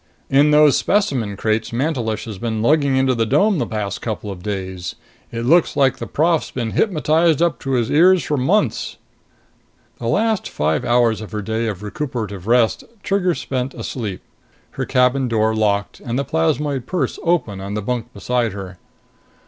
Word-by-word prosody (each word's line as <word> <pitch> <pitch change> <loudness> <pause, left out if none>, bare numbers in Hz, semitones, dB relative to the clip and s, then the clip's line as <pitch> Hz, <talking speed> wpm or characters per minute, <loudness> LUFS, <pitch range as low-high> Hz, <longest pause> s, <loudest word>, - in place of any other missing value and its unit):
In 140 +2 +5
those 150 -1 +6
specimen 130 - 0
crates 110 +1 -1
Mantelish 120 -4 -1
has 105 -4 -7
been 110 -1 -2
lugging 140 0 +3
into 130 0 +3
the 115 -2 +1
dome 200 - +3
the - - -1
past 105 -3 -4
couple 110 -2 -4
of 90 -2 -8
days. 95 -3 -4 0.4
It 115 - -4
looks 165 +6 +3
like 135 -2 +3
the - - -6
prof's 165 +1 +1
been 115 -3 -3
hypnotized 160 - +2
up 170 0 +1
to 135 - -3
his 120 -3 0
ears 180 +4 +5
for 150 - -1
months." 165 +11 0 1.0
The - - -4
last 220 -2 +1
five 75 0 0
hours 120 -3 +2
of 110 - -8
her 105 -1 -3
day 110 +2 -1
of 105 -2 -4
recuperative 105 - -5
rest 120 -1 +3 0.2
Trigger 185 -3 +1
spent 130 0 -3
asleep, 105 -7 -5 0.5
her - - -3
cabin 125 +1 +2
door 110 -1 +1
locked 100 -2 0
and 120 +1 -4
the 140 - -1
plasmoid 130 - 0
purse 165 -9 -2
open 135 - 0
on 100 +1 -5
the 105 - -2
bunk 120 +1 -3
beside 120 -4 -1
her. 95 -2 -8
120 Hz, 175 wpm, -20 LUFS, 105-150 Hz, 1.0 s, those